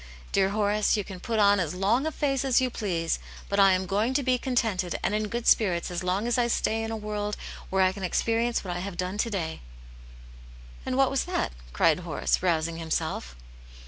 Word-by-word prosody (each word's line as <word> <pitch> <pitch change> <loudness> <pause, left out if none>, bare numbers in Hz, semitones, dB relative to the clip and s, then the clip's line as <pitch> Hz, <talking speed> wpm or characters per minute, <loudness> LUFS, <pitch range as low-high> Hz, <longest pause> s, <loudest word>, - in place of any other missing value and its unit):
Dear 195 -1 +3
Horace, 210 +1 +1
you 205 - -1
can 190 -1 -9
put 230 +3 -2
on 205 -1 +5
as 175 -1 -2
long 220 +10 +1
a - - -1
face 275 -3 0
as 265 -3 +3
you 255 -1 0
please, 170 -8 -1 0.3
but 200 - 0
I 195 -1 +7
am 185 0 0
going 210 +7 0
to 285 - +2
be 255 -1 +2
contented 220 -9 0
and - - +1
in 215 0 0
good 235 +3 -4
spirits 180 -5 +3
as 175 - -3
long 185 +4 0
as 240 +1 +1
I 240 - +3
stay 225 -1 0
in 225 - -3
a 225 - -3
world 210 -1 -3 0.3
where 190 0 +3
I 185 - +4
can 195 - -9
experience 230 +5 0
what 180 -2 -4
I - - -3
have 185 -1 -5
done 185 +3 -3
to 230 - +1
day." 170 -7 -3 1.3
"And 255 - -1
what 270 -1 +4
was 275 - 0
that?" 360 - -1 0.2
cried - - +3
Horace, - - -1
rousing 165 -2 0
himself. 160 - -3
205 Hz, 215 wpm, -27 LUFS, 185-235 Hz, 1.3 s, I